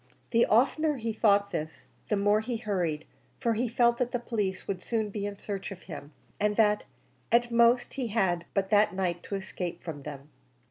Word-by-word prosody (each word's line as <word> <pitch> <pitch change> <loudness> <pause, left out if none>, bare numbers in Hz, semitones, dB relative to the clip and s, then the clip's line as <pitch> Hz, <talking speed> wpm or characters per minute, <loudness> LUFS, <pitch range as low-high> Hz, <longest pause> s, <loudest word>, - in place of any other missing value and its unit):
The 235 0 +4
oftener 285 +6 +3
he 225 -2 -2
thought 205 -2 +4
of 200 - -21
this, 155 -2 -5 0.2
the 210 - +3
more 205 +1 +3
he 230 +2 -3
hurried, 180 -9 -2 0.3
for 235 -3 +1
he 240 +3 0
felt 235 +1 +3
that 250 -1 0
the - - +1
police 210 -5 -3
would 195 -2 -2
be - - -20
soon 220 -3 -1
in 205 -1 -4
search 200 -1 -5
of 195 -2 -9
him, 150 -4 -9 0.3
and 210 0 +1
that 210 -1 +3 0.5
at 240 0 +3
most 235 +1 +4
he 260 -3 -2
had 190 -6 +1
but 195 0 0
that 205 -3 +4
night 175 -2 -1
to 200 - -5
escape 185 -2 -5
from 155 -4 -6
them. 140 0 -8
210 Hz, 200 wpm, -29 LUFS, 190-235 Hz, 0.5 s, The